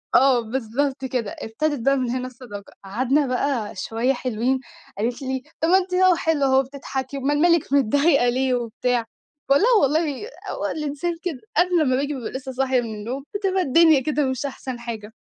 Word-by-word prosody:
آه 260 -1 +5
بالضبط 265 +4 -2
كده، 245 -5 -3
إبتدت 285 +6 -2
بقى 275 0 +4
من 250 -2 -1
هنا 255 +1 -2
الصداقة 235 -5 -10
قعدنا 260 +8 +1
بقى 250 -5 -1
شوية 230 +7 0
حلوين 250 +1 -1 0.4
قالت 235 +5 -2
لي: 260 -1 -3 0.2
"طب 325 - +2
ما 375 - +6
أنتِ 370 -1 -2
أهو 370 -1 +5
حلوة 320 -4 +1
أهو 265 0 +4
وبتضحكي 270 0 -4
أُمال 290 +2 0
مالِك 335 -5 +3
متضايقة 280 0 +3
ليه 260 +1 +1
وبتاع؟" 240 0 -1 0.4
باقول 280 +8 +5
لها: - - +5
"والله 305 - 0 0.2
هو - - -4
الإنسان 300 +3 -3
كده 320 -8 -3 0.2
قبل 355 -2 +3
أمّا 255 -4 +2
باجي 285 +2 -1
بابقى 250 -5 -5
لسه 265 0 -6
صاحي 260 -1 +1
من 225 -2 -5
النوم 245 +6 -5
بتبقى 385 -2 +1
الدنيا 320 -1 +5
كده 300 -1 0
مش 260 +1 -2
أحسن 260 -2 -6
حاجة." 225 -3 -7
265 Hz, 180 wpm, -23 LUFS, 245-295 Hz, 0.4 s, ما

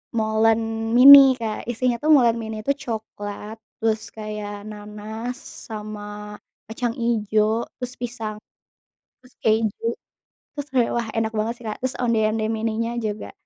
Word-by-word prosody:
molen 225 +1 +1
mini 270 +1 +10
Kak, 225 -2 -5
isinya 245 0 0
tuh 300 - -3
molen 235 -4 +4
mini 220 -1 -5
itu 280 - +1
coklat, 220 -5 -6 0.2
terus 220 -1 0
kayak 210 -1 -7
nanas 215 +3 -7 0.3
sama 210 -1 -7 0.2
kacang 230 +1 -3
ijo, 220 -1 +1
terus 250 0 -6
pisang, 225 -3 -5 0.8
terus 255 - -21
keju. 220 +1 0 0.6
Terus 290 0 -5
kayak 250 -3 +2
wah 235 -1 -1
enak 225 0 -1
banget 220 +2 -1
sih - - -13
Kak. 210 - -3
Terus 260 0 -2
onde-onde 220 -2 +1
mininya 225 +1 -2
juga. 215 -3 -4
225 Hz, 135 wpm, -23 LUFS, 215-235 Hz, 0.8 s, mini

